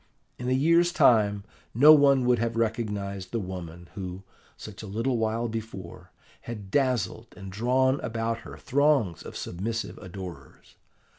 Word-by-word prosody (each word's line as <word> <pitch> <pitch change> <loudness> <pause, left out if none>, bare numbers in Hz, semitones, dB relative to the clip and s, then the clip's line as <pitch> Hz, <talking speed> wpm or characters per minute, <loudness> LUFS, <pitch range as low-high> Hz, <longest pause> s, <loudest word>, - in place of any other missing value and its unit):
In 125 +1 -3
a - - +2
year's 170 +6 +4
time 105 -8 +4 0.3
no 145 +6 +9
one 140 -3 +5
would 125 -2 +3
have 115 0 -1
recognised 105 -4 -2
the 115 - -1
woman 90 -3 -7
who, 95 -1 -6 0.3
such 105 -1 -9
a 110 - -8
little 115 +5 -1
while 110 +1 0
before, 95 -5 -7 0.4
had 105 -5 -7
dazzled 125 -4 0
and 95 -2 -8
drawn 130 +6 +2
about 115 0 -2
her - - -11
throngs 135 - +1
of - - -8
submissive 110 +6 -4
adorers. 90 -1 -10
115 Hz, 145 wpm, -27 LUFS, 95-125 Hz, 0.4 s, no